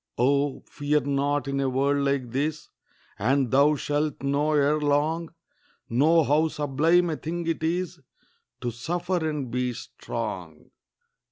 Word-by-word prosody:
Oh, 140 +3 +1
fear 145 +1 0
not 140 +1 0
in 140 0 -1
a 135 -1 +1
world 140 +2 +1
like 140 -3 -1
this, 150 +4 -2 0.5
And 130 +3 +1
thou 145 +3 +5
shalt 145 0 -2
know 145 +2 +1
ere 150 +1 +3
long, 150 +3 +1 0.6
Know 155 +7 +4
how 150 +3 +3
sublime 160 +4 +2
a 155 - -3
thing 170 +2 -4
it 165 -1 -1
is 175 +2 -1 0.6
To 120 - -2
suffer 175 +9 -2
and 140 -5 -4
be 125 0 -1
strong. - - -6
145 Hz, 140 wpm, -26 LUFS, 140-155 Hz, 0.6 s, thou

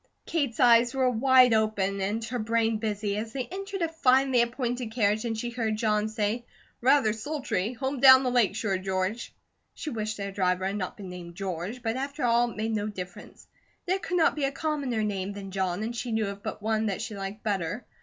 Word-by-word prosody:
Kate's 280 -9 -1
eyes 240 +1 +5
were 260 -1 +3
wide 255 0 +5
open 205 -3 +1
and 210 +4 -1
her 245 +2 -3
brain 225 0 +1
busy, 210 -2 -2
as 220 +1 -4
they 260 -2 -2
entered 390 -1 -4
a - - +2
finely 265 -5 +3
appointed 245 0 -2
carriage 215 -1 +1
and 225 -1 -2
she 240 +2 -3
heard 225 -3 -1
John 215 -1 +1
say: 220 +2 -1 0.4
"Rather 255 -4 +4
sultry. 255 -4 -2
Home 265 +2 -3
down 260 0 +9
the 250 - 0
lake 235 -5 +3
shore, 195 -4 -1
George." 190 +4 -2 0.4
She 305 - -5
wished 215 -1 -3
their 200 -1 -4
driver 185 -1 0
had 195 +1 -1
not 190 -3 -4
been 195 -3 -8
named 175 -1 -9
"George," 195 +5 -5
but 225 +1 -1
after 280 +1 -4
all 240 0 +3
it 230 - -11
made 220 +1 -1
no 210 -1 -1
difference. 180 -3 -9 0.4
There 375 +2 0
could 360 -1 -2
not 330 - +3
be 295 -2 0
a 275 - 0
commoner 280 -7 -2
name 200 -1 -2
than 195 -1 -8
John, 190 0 -1
and 235 +2 -3
she 240 0 -4
knew 220 -1 +1
of 200 0 -8
but 210 - -6
one 220 0 +1
that 200 +1 -2
she 225 -3 -5
liked 195 +2 -6
better. 205 +1 -2
225 Hz, 215 wpm, -27 LUFS, 200-250 Hz, 0.4 s, down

